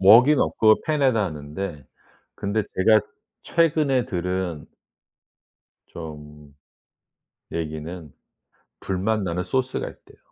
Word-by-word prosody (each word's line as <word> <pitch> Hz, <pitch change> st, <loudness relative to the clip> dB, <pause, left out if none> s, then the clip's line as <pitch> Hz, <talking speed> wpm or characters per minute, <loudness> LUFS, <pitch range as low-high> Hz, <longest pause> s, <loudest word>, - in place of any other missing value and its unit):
웍은 120 Hz, +9 st, +7 dB
없고 110 Hz, -1 st, +3 dB
팬에다 135 Hz, -8 st, +2 dB
하는데 75 Hz, 0 st, -5 dB, 0.5 s
근데 105 Hz, +2 st, -1 dB
제가 110 Hz, +3 st, +5 dB, 0.4 s
최근에 150 Hz, -6 st, +2 dB
들은 90 Hz, -3 st, -3 dB, 1.2 s
좀 75 Hz, -3 st, -10 dB, 1.0 s
얘기는 80 Hz, 0 st, -5 dB, 0.7 s
불맛 100 Hz, +3 st, -1 dB
나는 90 Hz, 0 st, -2 dB
소스가 130 Hz, +3 st, -1 dB
있대요. -, -, -18 dB
95 Hz, 190 characters per minute, -24 LUFS, 80-115 Hz, 1.2 s, 웍은